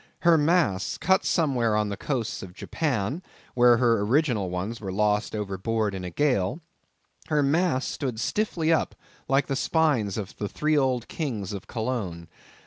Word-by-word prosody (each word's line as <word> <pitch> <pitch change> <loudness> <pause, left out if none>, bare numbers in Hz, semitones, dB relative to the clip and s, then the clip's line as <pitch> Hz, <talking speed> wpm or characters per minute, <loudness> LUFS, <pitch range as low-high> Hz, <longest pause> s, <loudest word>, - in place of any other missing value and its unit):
Her 170 -1 +6
masts—cut 160 - +2
somewhere 125 - +1
on 105 -1 +1
the 100 - -3
coast 120 -1 -3
of 90 -1 -10
Japan, 135 - -2 0.3
where 120 -1 +5
her 115 -3 +3
original 115 - +1
ones 95 +6 -4
were 95 -3 -4
lost 105 +2 +1
overboard 105 +1 -1
in 95 -1 -5
a 90 - -4
gale—her 150 - -2
masts 150 -1 +1
stood 125 -6 -3
stiffly 165 - 0
up 160 - 0 0.3
like 135 +1 +2
the 135 - -2
spines 135 - +1
of 100 -4 -5
the 105 - -3
three 155 0 0
old 130 -4 +1
kings 110 - -4
of 100 -2 -7
Cologne. 110 -9 -4
120 Hz, 150 wpm, -26 LUFS, 105-150 Hz, 0.3 s, Her